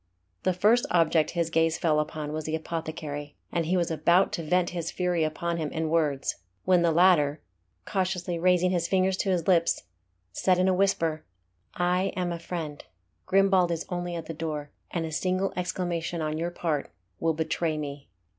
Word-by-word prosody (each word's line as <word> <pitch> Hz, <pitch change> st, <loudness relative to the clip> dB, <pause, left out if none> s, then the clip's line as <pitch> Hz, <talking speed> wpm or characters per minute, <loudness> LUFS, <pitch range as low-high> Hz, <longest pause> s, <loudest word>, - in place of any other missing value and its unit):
The 185 Hz, -, +1 dB
first 215 Hz, +7 st, +3 dB
object 165 Hz, -2 st, +3 dB
his 165 Hz, -1 st, 0 dB
gaze 165 Hz, 0 st, +2 dB
fell 155 Hz, -3 st, +2 dB
upon 150 Hz, 0 st, -3 dB
was 155 Hz, 0 st, -4 dB
the 155 Hz, -, -1 dB
apothecary, 155 Hz, -3 st, -5 dB, 0.2 s
and 165 Hz, -2 st, -1 dB
he 185 Hz, +2 st, +2 dB
was 170 Hz, -1 st, 0 dB
about 170 Hz, +4 st, +3 dB
to 180 Hz, -, -2 dB
vent 175 Hz, +3 st, +1 dB
his 170 Hz, -2 st, -3 dB
fury 180 Hz, -2 st, 0 dB
upon 170 Hz, +2 st, -2 dB
him 155 Hz, -2 st, -2 dB
in 160 Hz, 0 st, -2 dB
words, 150 Hz, -5 st, +1 dB, 0.3 s
when 180 Hz, -2 st, +4 dB
the 170 Hz, -, +3 dB
latter, 160 Hz, -4 st, +4 dB, 0.5 s
cautiously 180 Hz, -2 st, -1 dB
raising 180 Hz, +1 st, +3 dB
his 170 Hz, -2 st, 0 dB
finger 190 Hz, 0 st, +2 dB
to 190 Hz, +1 st, -1 dB
his 175 Hz, -3 st, 0 dB
lips, 170 Hz, -3 st, +3 dB, 0.5 s
said 180 Hz, -, +2 dB
in 185 Hz, +1 st, +3 dB
a 190 Hz, -, +4 dB
whisper 165 Hz, -5 st, +1 dB, 0.5 s
"I 180 Hz, +2 st, +1 dB
am 180 Hz, -1 st, -1 dB
a 170 Hz, -, -4 dB
friend. 160 Hz, -4 st, -5 dB, 0.4 s
Grimbald 190 Hz, -2 st, +4 dB
is 170 Hz, -1 st, -2 dB
only 175 Hz, -1 st, -3 dB
at 165 Hz, -, -5 dB
the 165 Hz, -, -5 dB
door, 150 Hz, -2 st, -4 dB, 0.2 s
and 170 Hz, -2 st, -2 dB
a 160 Hz, -, -5 dB
single 185 Hz, +4 st, 0 dB
exclamation 175 Hz, -2 st, -2 dB
on 155 Hz, -1 st, -1 dB
your 170 Hz, +1 st, -1 dB
part 165 Hz, -4 st, -2 dB, 0.3 s
will 165 Hz, -1 st, +1 dB
betray 160 Hz, 0 st, -1 dB
me." 140 Hz, -2 st, -6 dB
170 Hz, 185 wpm, -27 LUFS, 160-180 Hz, 0.5 s, when